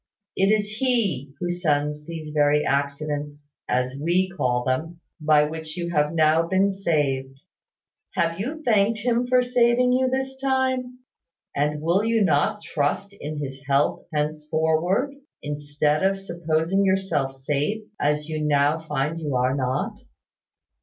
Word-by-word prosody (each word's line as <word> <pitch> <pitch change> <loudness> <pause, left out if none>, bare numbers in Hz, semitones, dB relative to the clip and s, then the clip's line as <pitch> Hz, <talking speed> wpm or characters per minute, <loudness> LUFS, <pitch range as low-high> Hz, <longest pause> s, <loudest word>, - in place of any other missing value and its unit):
It 195 - +3
is 215 -1 +2
He 200 - 0
who 175 - -1
sends 150 -4 0
these 160 -2 -7
very 150 0 +3
accidents 145 +1 -2 0.2
(as 125 +2 0
we 180 +3 +2
call 125 -9 0
them) 160 +7 -2 0.2
by 150 -1 +4
which 160 +2 -5
you 170 -1 -3
have 150 -2 +2
now 160 0 +3
been 190 +2 +2
saved. 140 -8 -1 0.8
Have 165 +1 0
you 300 +9 -4
thanked 220 -2 +2
Him 240 +1 +1
for 250 0 +4
saving 245 0 +3
you 260 0 +2
this 265 +1 -2
time? 260 -2 0 0.5
And 150 +1 0
will 175 +5 +2
you 225 -1 +2
not 190 +6 +1
trust 160 +7 -1
in 155 -6 -6
His 135 -1 -6
help 140 +1 +1
henceforward; 155 - 0 0.3
instead 145 +1 -1
of 195 +1 +2
supposing 170 0 0
yourself 190 -8 +1
safe, 145 +10 -2 0.2
as 150 +1 0
you 155 -1 -3
now 145 +1 +2
find 155 +1 -2
you 145 -4 -2
are 125 +1 +2
not? 130 -1 -2
160 Hz, 140 wpm, -24 LUFS, 145-200 Hz, 0.8 s, by